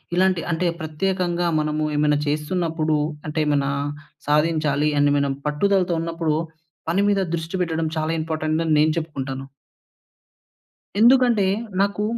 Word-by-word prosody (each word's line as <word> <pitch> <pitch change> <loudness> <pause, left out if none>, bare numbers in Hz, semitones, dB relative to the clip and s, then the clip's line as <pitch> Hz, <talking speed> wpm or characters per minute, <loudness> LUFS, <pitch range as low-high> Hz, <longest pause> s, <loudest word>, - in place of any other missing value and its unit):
ఇలాంటి 185 -1 +2
అంటే, 170 +2 0
ప్రత్యేకంగా 175 +2 -1
మనము 150 0 -1
ఏమైనా 150 0 +3
చేస్తున్నప్పుడు, 155 +1 0 0.3
అంటే 155 +1 -2
ఏమైనా 140 -2 +1 0.6
సాధించాలి 150 -1 +2
అని 145 0 +4
మనం 140 -1 0
పట్టుదలతో 180 +3 +1
ఉన్నప్పుడు, 165 -2 -1 0.5
పని 180 +4 +2
మీద 200 -1 +2
దృష్టి 165 +2 -5
పెట్టడం 165 -2 -1
చాలా 155 +1 0
ఇంపార్టెంటని 155 0 -1
నేను 155 +1 +3
చెప్పుకుంటాను. 135 -4 -4 1.5
ఎందుకంటే, 240 -3 +5 0.4
నాకు 200 +1 0
160 Hz, 115 wpm, -22 LUFS, 150-180 Hz, 1.5 s, ఎందుకంటే